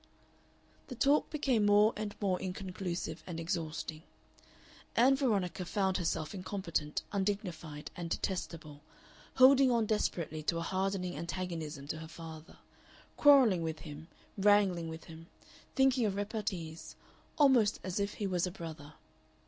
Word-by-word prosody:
The 255 - -7
talk 280 +5 +3
became 265 -8 +1
more 205 +2 +5
and 210 -1 -4
more 190 -3 0
inconclusive 180 -3 -4
and 170 -2 -5
exhausting. 160 -2 -3 0.9
Ann 255 +4 +5
Veronica 200 - 0
found 190 +1 0
herself 165 -2 -2
incompetent, 180 -6 -3
undignified, 190 -7 -3
and 170 -1 -5
detestable, 165 -5 -4 0.5
holding 265 +1 +7
on 235 -2 +2
desperately 170 -7 -1
to 165 +2 0
a 165 - -2
hardening 190 -1 -1
antagonism 165 -5 -5
to 160 - -3
her 160 - -8
father, 160 0 -10 0.6
quarrelling 260 - +6
with 160 -1 -4
him, 155 0 -9 0.3
wrangling 195 -4 +3
with 160 0 -8
him, 165 0 -12 0.5
thinking 265 -4 +4
of 195 - -2
repartees 200 -6 -4 0.4
almost 255 -8 +4
as 185 +1 -3
if 200 0 -2
he 205 - -3
was 180 -2 0
a - - -4
brother. 160 -4 -8
185 Hz, 130 wpm, -32 LUFS, 165-210 Hz, 0.9 s, holding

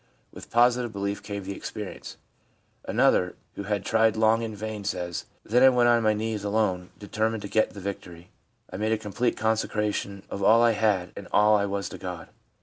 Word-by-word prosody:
With - - -11
positive 120 0 +3
belief 100 0 -3
came 100 -1 -6
the 100 +1 -5
experience/ 105 -1 -7 0.7
Another, 90 -1 +2 0.2
who 100 - -6
had 100 -1 -2
tried 110 -1 +3
long 110 +1 +3
in 110 -2 -4
vain, 105 0 -5
says: 90 -4 -3
' - - -39
Then 120 +3 +3
I 130 - +9
went 120 -2 +3
on 120 -1 +4
my 110 -1 +2
knees 110 -1 -3
alone, 100 -4 0
determined 110 +1 -2
to - - -4
get 110 +1 +1
the - - -7
victory. 90 -3 -7 0.4
I - - -4
made 110 +2 0
a - - +1
com 105 -2 -9
plete 125 -1 0
consecration 105 -2 -1
of 100 - -6
all 115 +4 +5
I 120 - +5
had 105 -5 +1
and 100 - -8
all 105 +1 +5
I 100 -1 +1
was 100 0 -3
to - - -9
God. 90 -3 -7
105 Hz, 205 wpm, -26 LUFS, 100-110 Hz, 0.7 s, I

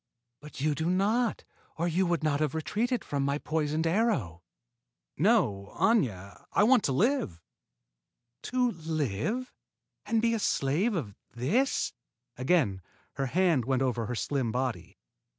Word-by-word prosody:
But 150 -1 -11
you 150 +1 +2
do 160 +4 -1
not, 215 +6 +1 0.3
or 170 +2 0
you 180 +2 +1
would 170 -2 0
not 145 -2 +1
have 155 -1 0
retreated 230 +10 -1
from 140 -1 -2
my 140 +1 0
poisoned 155 +1 -1
arrow." 165 - 0 0.7
"No, 100 -1 +1
Aña; 100 - +1
I - - +4
want 245 0 +5
to - - +1
live." 185 - +1 1.0
"To 250 -1 +1
live 160 - -2 0.5
and 225 - +2
be 230 +1 +2
a 225 - 0
slave 180 - +1
of 120 - -3 0.2
this?" 200 - +1 0.4
Again 130 - +1 0.4
her 135 -1 0
hand 165 -4 +2
went 130 0 +1
over 120 -4 -1
her 125 - -3
slim 130 -1 -1
body. 125 0 -3
155 Hz, 140 wpm, -29 LUFS, 130-210 Hz, 1.0 s, want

